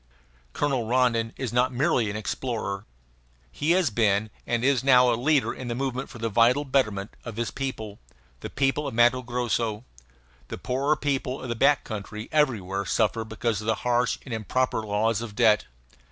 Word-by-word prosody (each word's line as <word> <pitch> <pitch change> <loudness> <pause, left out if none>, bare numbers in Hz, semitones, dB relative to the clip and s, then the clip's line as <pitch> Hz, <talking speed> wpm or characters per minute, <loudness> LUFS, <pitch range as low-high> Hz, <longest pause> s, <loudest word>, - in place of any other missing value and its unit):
Colonel 135 -6 0
Rondon 115 -2 +2
is 125 -3 -4
not 125 +1 +2
merely 125 -4 +1
an 100 - -4
explorer. 110 -2 -3 0.6
He 150 - -3
has 180 -8 +2
been 105 -1 +1 0.2
and 120 0 0
is 135 -2 +2
now 125 -2 +6
a - - +2
leader 140 +4 +1
in 130 - -7
the 120 - -2
movement 130 0 -3
for 125 - -10
the 115 0 -2
vital 120 +6 +3
betterment 110 -7 0
of 115 -3 -7
his 115 -1 -2
people, 110 -7 -5 0.4
the - - -6
people 140 +2 0
of - - -5
Matto 120 +2 +4
Grosso. 120 -2 -2 0.6
The - - -6
poorer 140 +4 0
people 135 -2 -2
of 130 - -7
the 120 - -1
back 140 +4 +3
country 105 0 -7
everywhere 105 -11 +1
suffer 110 +3 0
because 110 -1 -2
of 110 - -7
the 110 - +2
harsh 125 0 +2
and 130 - -6
improper 115 +2 0
laws 110 +1 0
of 115 -3 -7
debt. 110 -3 +4
120 Hz, 180 wpm, -26 LUFS, 110-130 Hz, 0.6 s, now